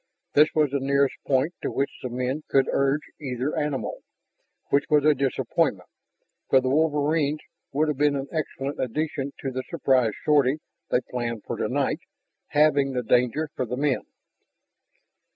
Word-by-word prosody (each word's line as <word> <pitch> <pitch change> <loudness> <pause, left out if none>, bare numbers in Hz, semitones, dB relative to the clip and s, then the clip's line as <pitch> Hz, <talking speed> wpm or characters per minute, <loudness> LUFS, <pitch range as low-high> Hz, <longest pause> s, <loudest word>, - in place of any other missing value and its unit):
This 150 +1 +6
was 150 -3 +3
the 140 - 0
nearest 140 0 +2
point 140 +5 +2
to - - -1
which 140 +1 -1
the 125 - -4
men 125 +4 -2
could 135 -1 +3
urge 140 +2 +1 0.2
either 130 0 -3
animal, 140 -8 -2 0.7
which 140 0 +3
was 150 -1 +4
a 155 - +6
disappointment, 130 - 0 0.6
for 135 - +6
the 130 0 -1
wolverines 150 0 +1 0.3
would 150 +3 +1
have 150 -3 -1
been 145 -1 +3
an 135 0 -3
excellent 145 -3 -3
addition 140 +2 -2
to 135 - -3
the 130 0 -3
surprise 125 -5 +2
sortie 145 -2 +4 0.3
they 125 - +2
planned 120 -3 -4
for - - -4
tonight, - - 0 0.5
halving 145 -2 +3
the 125 -1 -1
danger 125 +6 +2
for 130 - -2
the 125 - -3
men. 140 -1 0
140 Hz, 155 wpm, -25 LUFS, 130-150 Hz, 0.7 s, This